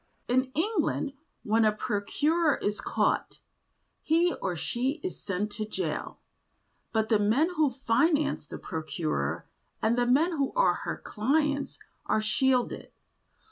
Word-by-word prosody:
In 255 +2 +3
England 325 -5 0 0.3
when 225 +1 +3
a 215 - +5
procurer 290 +10 +1
is 205 +1 -2
caught, - - 0 0.6
he 340 +3 +3
or 180 -2 -1
she 245 - -1
is 370 - -5
sent 200 +2 -2
to 215 +1 -3
jail, 300 - -3 0.7
but 220 -1 0
the 220 - +4
men 245 - +3
who 305 -2 +3
finance 275 - +1
the - - -7
procurer 155 - -3 0.3
and 225 +2 +2
the 245 - +2
men 295 +8 +4
who 280 -5 -1
are - - +4
her - - -4
clients 285 +5 0 0.3
are 215 - +2
shielded. 250 +4 +1
250 Hz, 135 wpm, -28 LUFS, 210-300 Hz, 0.7 s, a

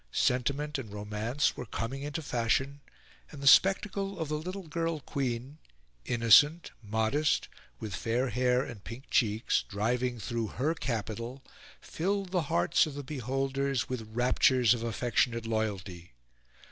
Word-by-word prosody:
Sentiment 140 +4 0
and 110 -6 -8
romance 105 +6 -1
were 125 - -7
coming 115 +6 -4
into 150 +3 -4
fashion; 135 +3 0 0.5
and 145 - -10
the 140 - -6
spectacle 195 +5 +4
of 160 -3 -3
the 150 0 -1
little 185 +2 -6
girl 165 0 -2
queen, 130 +1 -4 0.5
innocent, 125 +8 +5
modest, 110 +8 +1 0.3
with 105 -4 -5
fair 120 +3 0
hair 125 +2 +2
and 115 -8 -9
pink 120 +4 -10
cheeks, 110 -2 +2
driving 120 +4 -1
through 115 +1 -2
her 145 +9 -1
capital, 115 -1 -4 0.4
filled 195 +3 -2
the 180 -2 +2
hearts 85 - +3
of 145 - -7
the 145 - -5
beholders 135 0 -2
with 115 -4 -5
raptures 125 -1 +4
of 120 - -4
affectionate 115 +1 0
loyalty. 100 - -3
125 Hz, 135 wpm, -30 LUFS, 115-145 Hz, 0.5 s, innocent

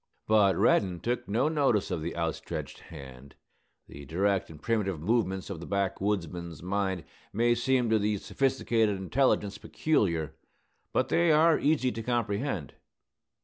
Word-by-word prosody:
But 105 -3 +4
Reddin 95 -4 +2
took 120 +1 -2
no 115 +8 +1
notice 140 -12 +1
of 85 -3 -2
the 85 +2 -5
outstretched 80 -1 -4
hand. 65 0 -12 0.5
The 70 - -11
direct 95 +4 0
and 80 -2 -11
primitive 100 -6 -1
movements 95 0 -1
of 90 - -5
the 85 - -8
backwoodsman's 95 -4 -2
mind 95 -2 -1 0.3
may 120 +3 +2
seem 125 +1 +1
to 110 - +4
the 105 0 0
sophisticated 115 -4 0
intelligence 105 0 0
peculiar; 85 - 0 0.6
but - - 0
they 170 -1 +3
are 160 +1 +5
easy 145 -4 +2
to 115 - -5
comprehend. 110 - -2
100 Hz, 140 wpm, -29 LUFS, 90-120 Hz, 0.6 s, are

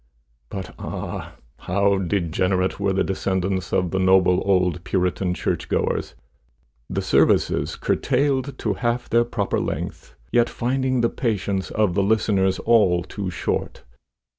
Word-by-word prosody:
But 95 -2 -6
ah! - - -6 0.2
how 100 +1 +1
degenerate 90 0 0
were 100 -1 +1
the 95 0 +1
descendants 95 -2 -1
of 90 -2 +1
the 95 - 0
noble 95 -1 +4
old 90 -3 +1
Puritan 90 -1 0
church - - -2
goers! - - -1 0.7
The - - -2
services - - +2
curtailed 135 0 0
to 110 - -1
half 120 +3 -1
their 120 +1 +4
proper 105 -4 -1
length, - - -5 0.2
yet 120 0 +3
finding 130 +1 0
the 115 - +2
patience 100 -5 -2
of 105 -4 +1
the 100 - +2
listeners 100 -2 +2
all 100 -7 +3
too 100 +1 -5
short! 90 - -3
95 Hz, 135 wpm, -23 LUFS, 95-115 Hz, 0.7 s, noble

